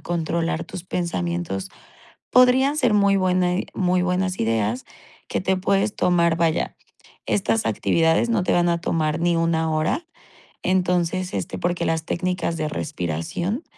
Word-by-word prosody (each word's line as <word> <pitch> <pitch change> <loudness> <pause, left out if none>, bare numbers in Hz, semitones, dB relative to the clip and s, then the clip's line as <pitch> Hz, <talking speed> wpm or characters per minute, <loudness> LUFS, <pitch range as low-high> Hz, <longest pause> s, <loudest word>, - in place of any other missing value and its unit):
controlar 170 -1 -1
tus 185 - -8
pensamientos, 95 - -3 0.6
podrían 255 +3 +5
ser 245 -7 +2
muy 200 -1 +4
buena 180 -1 +2
i - - -3
muy 180 -1 +1
buenas 180 +1 -1
ideas 115 +1 0 0.4
que - - -2
te 190 0 +1
puedes 195 +2 +1
tomar, 170 -2 +2
vaya, 165 -1 0 0.5
estas 215 +2 +1
actividades 165 +7 +2
no 230 -4 +2
te - - +1
van 175 0 +3
a 170 0 0
tomar 155 -3 0
ni 175 0 +2
1 165 -1 +1
hora, 155 - 0 0.6
entonces, 180 0 0
este, - - -3
porque 175 0 -1
las 160 0 -1
técnicas 180 -1 -2
de 155 -1 -2
respiración 150 - -3
175 Hz, 145 wpm, -23 LUFS, 160-185 Hz, 0.6 s, podrían